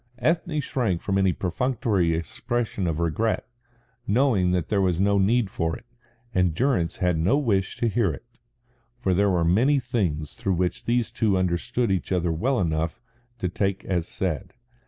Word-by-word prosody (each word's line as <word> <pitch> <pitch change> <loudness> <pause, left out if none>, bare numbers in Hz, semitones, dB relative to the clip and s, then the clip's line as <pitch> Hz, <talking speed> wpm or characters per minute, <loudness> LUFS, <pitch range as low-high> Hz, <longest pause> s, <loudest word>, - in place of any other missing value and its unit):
Ethne 160 +2 0
shrank 120 - -1
from 95 +1 0
any 95 -1 +3
perfunctory 95 -2 0
expression 100 +4 -2
of 80 -2 -1
regret, 85 +7 0 0.6
knowing 110 -5 +3
that 90 -3 0
there 100 -2 +1
was 90 -3 +1
no 100 +1 +3
need 110 +3 +3
for 80 -3 -2
it, - - -19 0.5
and 90 -4 +2
Durrance 115 -10 +1
had 90 -3 +1
no 95 - +3
wish 100 -9 0
to 120 - +1
hear 110 -4 +1
it. 70 - -9 0.7
For 95 -6 +1
there 100 +3 +3
were 90 -3 +2
many 125 - +3
things 95 - -2
which 90 -2 0
these 120 -1 +1
two 105 -4 +1
understood 95 +5 0
each 95 -1 -1
other 90 -2 +1
well 120 +11 0
enough 80 -2 -1 0.4
to 95 - -2
take 95 +2 -2
as 90 -3 -1
said. 90 +3 -3
95 Hz, 165 wpm, -25 LUFS, 85-115 Hz, 0.7 s, any